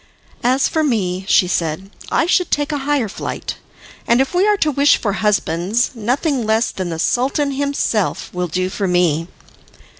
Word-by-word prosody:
"As 260 +3 +3
for 315 - 0
me," 190 -8 -1
she 180 - +4
said, 175 +2 -2 0.2
"I - - +2
should 360 0 +2
take 290 +1 0
a 295 - -1
higher 280 -6 +2
flight; - - -5 0.5
and 235 +1 +4
if 270 +4 0
we 370 +3 +3
are 420 -1 +3
to 310 -5 +1
wish 285 +1 +4
for 205 -3 -2
husbands, 205 +1 0
nothing 255 +4 -1
less 220 +2 +1
than 185 -2 -4
the 165 - -4
Sultan 275 - 0
himself 275 -7 -1
will 180 0 -2
do 185 +3 -1
for 200 0 -2
me." 170 -3 +1
225 Hz, 175 wpm, -18 LUFS, 185-285 Hz, 0.5 s, she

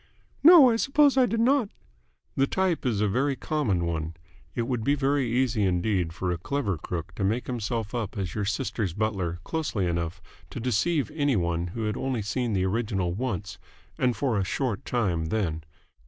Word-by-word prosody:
"No. 310 -6 +9
I 225 - +1
suppose 280 +3 +4
I 260 -2 +5
did 225 +1 0
not." 250 -2 +3 0.7
"The 135 0 +2
type 185 -6 0
is 105 -4 0
a 105 - +3
very 135 +7 +1
common 110 - -1
one. 80 -1 -3 0.4
It 120 - 0
would 120 -2 -2
be 140 +5 +2
very 140 -2 +1
easy 120 -3 +1
indeed 90 -1 +1
for 90 +2 -2
a 85 - -2
clever 135 - -1
crook 85 +2 -5
to 100 - -4
make 110 +6 0
himself 115 -2 -3
up 115 -3 -3
as 95 -4 -3
your 105 - -2
sister's 100 -2 -2
butler 95 -6 -1
closely 150 - -2
enough 85 0 -2 0.3
to - - -6
deceive 125 +6 0
any 145 -4 +1
one 85 -2 0
who 115 - -2
had 105 -1 -1
only 130 -5 -2
seen 115 +3 -1
the 95 -1 +1
original 95 -3 -1
once 100 -5 -4 0.4
and 125 -2 +1
for 125 -7 0
a - - +1
short 115 +1 -2
time 95 -10 0
then. 80 -4 -1
110 Hz, 185 wpm, -27 LUFS, 95-135 Hz, 0.7 s, No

